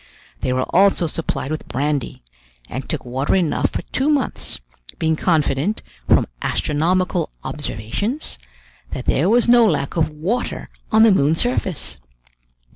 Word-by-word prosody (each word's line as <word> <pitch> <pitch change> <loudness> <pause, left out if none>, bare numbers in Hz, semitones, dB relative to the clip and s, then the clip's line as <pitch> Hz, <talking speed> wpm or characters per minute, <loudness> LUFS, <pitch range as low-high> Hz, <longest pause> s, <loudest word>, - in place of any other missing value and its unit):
They 130 - -1
were 130 0 +1
also 190 -1 +4
supplied 155 -3 -3
with 155 - -4
brandy, 140 - -2 0.4
and 130 +3 -6
took 155 -6 -3
water 130 +6 0
enough 175 -5 +1
for - - -4
two 270 +3 +1
months, 290 -3 0 0.4
being 160 -1 +1
confident, 160 +3 +1 0.3
from - - +5 0.2
astronomical 175 +3 0
observations, 150 - -3 0.5
that - - -4
there 160 +8 +2
was 240 +2 +4
no 240 0 +7
lack 150 -8 +1
of 160 - +2
water 175 +12 -3 0.2
on 220 0 +6
the 225 - +7
moon's 160 -3 +3
surface. 185 - -2
160 Hz, 135 wpm, -21 LUFS, 140-200 Hz, 0.5 s, no